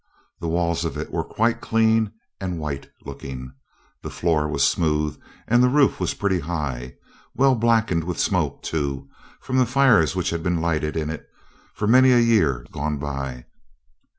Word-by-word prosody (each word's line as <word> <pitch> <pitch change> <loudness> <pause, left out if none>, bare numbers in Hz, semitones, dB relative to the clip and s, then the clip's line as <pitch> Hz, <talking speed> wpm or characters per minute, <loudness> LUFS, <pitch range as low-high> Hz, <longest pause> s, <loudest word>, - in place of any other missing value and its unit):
The 85 - -4
walls 85 0 0
of - - -3
it - - -5
were - - -1
quite 115 +1 0
clean 110 -1 +2 0.3
and 90 -3 -3
white 75 -3 -5 0.2
looking, 65 -1 -8 0.5
the - - -6
floor 80 -3 0
was 75 - +2
smooth, 75 -2 0 0.3
and 120 +2 +4
the 125 - +5
roof 140 +1 +3
was - - -1
pretty 100 -3 0
high, 75 -7 -4 0.4
well 135 0 +4
blackened 115 -8 +2
with 90 -2 -3
smoke, - - 0
too, 70 -4 -3 0.3
from 130 - -2
the 130 - +4
fires 125 - +4
which 90 -2 -1
had 85 -1 -2
been 85 0 0
lighted 80 -2 -1
in 80 -1 -2
it 80 - -8 0.5
for 105 - -2
many 130 +4 +6
a - - +5
year 100 - +2
gone 75 0 -2
by. 70 -3 -5
85 Hz, 170 wpm, -23 LUFS, 75-115 Hz, 0.5 s, many